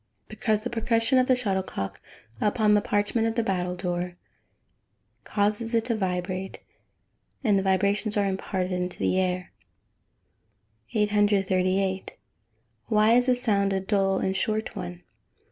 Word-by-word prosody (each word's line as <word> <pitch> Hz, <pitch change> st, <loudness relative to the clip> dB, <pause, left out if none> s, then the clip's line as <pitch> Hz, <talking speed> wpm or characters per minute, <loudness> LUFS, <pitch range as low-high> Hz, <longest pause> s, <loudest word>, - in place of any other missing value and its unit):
_ -, -, -47 dB
Because 215 Hz, -2 st, -1 dB
the -, -, -4 dB
percussion 230 Hz, +2 st, +2 dB
of 255 Hz, -, +2 dB
the 255 Hz, -, +5 dB
shuttlecock 190 Hz, -, -3 dB, 0.4 s
upon 210 Hz, 0 st, +3 dB
the 205 Hz, -, +4 dB
parchment 205 Hz, +3 st, 0 dB
of 225 Hz, -, -2 dB
the 230 Hz, -, +1 dB
battledore 180 Hz, -2 st, -2 dB, 1.1 s
causes 215 Hz, +3 st, 0 dB
it 225 Hz, -1 st, +2 dB
to 235 Hz, -1 st, 0 dB
vibrate, 185 Hz, -1 st, -3 dB, 0.9 s
and 205 Hz, -5 st, +3 dB
the -, -, 0 dB
vibrations 200 Hz, +3 st, +1 dB
are 205 Hz, -, +2 dB
imparted 185 Hz, -2 st, -2 dB
to -, -, -10 dB
the 185 Hz, -, +1 dB
air. 180 Hz, -1 st, -1 dB, 1.4 s
838. 195 Hz, -2 st, +1 dB, 0.8 s
_Why 215 Hz, +1 st, +4 dB
is 245 Hz, +1 st, +3 dB
the 255 Hz, -, +4 dB
sound 200 Hz, -5 st, +1 dB
a 190 Hz, -, +1 dB
dull 195 Hz, 0 st, +1 dB
and 190 Hz, 0 st, -1 dB
short 215 Hz, +2 st, -1 dB
one? 90 Hz, 0 st, -6 dB
200 Hz, 135 wpm, -26 LUFS, 185-220 Hz, 1.4 s, the